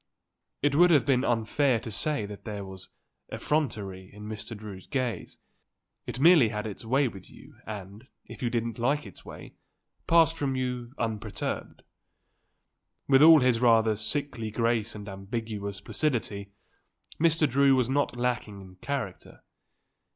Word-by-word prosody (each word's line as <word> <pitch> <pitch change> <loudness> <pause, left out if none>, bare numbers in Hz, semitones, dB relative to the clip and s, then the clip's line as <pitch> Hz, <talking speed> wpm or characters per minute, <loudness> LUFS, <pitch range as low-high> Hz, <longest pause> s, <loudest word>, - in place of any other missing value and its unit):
It 145 -1 +3
would 175 +5 +6
have 145 -8 +4
been 130 -2 +2
unfair 120 +2 +1
to 115 - -7
say 115 +1 0
that 100 0 -9
there 105 -3 -5
was 95 -1 -10 0.4
effrontery 100 -11 -2
in 105 +1 -12
Mr. 110 +1 -7
Drew's 100 -3 -10
gaze; 130 -5 -3 0.7
it - - -5
merely 155 -6 +6
had 105 0 -4
its 105 0 -6
way 135 +4 +2
with 100 -6 -10
you - - -16
and, 105 +3 -8 0.2
if - - -11
you 120 - 0
didn't 115 0 -2
like 140 +4 +1
its 100 - -12
way, - - -11 0.5
passed 165 -1 +5
from 135 -3 -1
you 125 -2 -3
unperturbed. 110 -3 -4 1.2
With 135 0 +5
all 160 -1 +9
his 125 -2 +3
rather 115 -2 +4
sickly 115 +1 -3
grace 115 0 0
and 105 -1 -8
ambiguous 100 0 -5
placidity, 110 -9 -2 0.7
Mr. 165 -1 +3
Drew 140 +1 +4
was 125 -3 +2
not 140 0 0
lacking 120 -4 -2
in 95 -1 -13
character. 125 -3 -5
115 Hz, 145 wpm, -28 LUFS, 105-135 Hz, 1.2 s, all